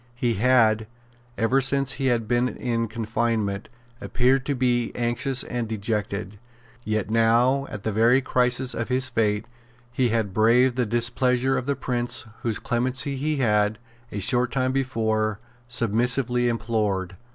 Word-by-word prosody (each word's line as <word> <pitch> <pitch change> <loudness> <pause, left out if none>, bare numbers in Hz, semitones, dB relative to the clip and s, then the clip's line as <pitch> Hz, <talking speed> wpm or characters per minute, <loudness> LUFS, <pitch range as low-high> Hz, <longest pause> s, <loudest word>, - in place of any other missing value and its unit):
He 120 -1 0
had, 110 -1 +3 0.5
ever 125 +4 +2
since 135 0 +3
he 135 - -2
had 115 -3 0
been 120 +2 +1
in 115 -2 -2
confinement, 110 -2 -2 0.3
appeared 130 +3 +1
to 140 - 0
be 120 -2 0
anxious 125 +2 -1
and 120 -2 -4
dejected; 105 -2 -3 0.4
yet 110 -2 -2
now, 120 +5 +3
at 100 - -7
the 110 - -1
very 115 +5 +4
crisis 125 -1 +1
of 115 - -3
his 130 +1 +2
fate, 110 -3 0 0.5
he 125 0 +1
had 110 -4 -1
braved 120 +4 +4
the 125 -2 0
displeasure 120 +3 +1
of 130 - -3
the 140 - +1
Prince 120 -2 -1 0.2
whose 115 -3 -1
clemency 125 +3 -1
he 150 +3 -1
had, 105 -4 +1 0.3
a - - -5
short 125 +5 +1
time 130 -1 0
before, 110 -5 -1 0.3
submissively 120 +1 +1
implored. 105 -5 -1
120 Hz, 145 wpm, -24 LUFS, 110-125 Hz, 0.5 s, very